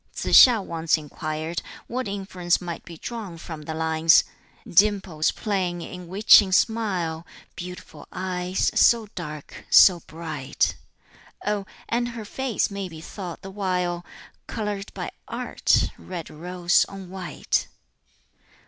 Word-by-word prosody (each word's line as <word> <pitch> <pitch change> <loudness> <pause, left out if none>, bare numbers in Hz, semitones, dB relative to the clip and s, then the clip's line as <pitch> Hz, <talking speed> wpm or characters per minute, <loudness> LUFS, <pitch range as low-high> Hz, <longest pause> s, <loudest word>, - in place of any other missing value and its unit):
Tsz - - +8
hiŠ 225 -6 0
once 165 -1 +1
inquired 155 +2 -4 0.2
what 255 0 -3
inference 190 -3 -1
might 175 -2 -6
be 170 -2 -11
drawn 210 -4 -6
from 160 -1 -8
the 160 +1 -6
lines 160 0 +4 0.4
"Dimples 190 -4 +3
playing 180 -4 -2
in 180 0 -8
witching 195 +1 +6
smile, 185 -7 +1 0.3
Beautiful 180 +1 -9
eyes, 180 0 -1
so 230 -3 +4
dark, 155 -5 -8
so 180 -3 +8
bright! 155 -5 -2 0.7
Oh, 205 -2 -1 0.2
and 240 +1 0
her 220 - -6
face 255 -1 -1
may 200 -2 -4
be 160 -2 -10
thought 175 +1 -8
the 195 - -8
while 180 -3 -1 0.4
Colored 210 -3 -4
by - - -4 0.2
art, - - +1
red 175 -3 -7
rose 175 +2 +1
on 190 -2 -9
white!" 190 -2 -2
180 Hz, 125 wpm, -24 LUFS, 165-200 Hz, 0.7 s, Tsz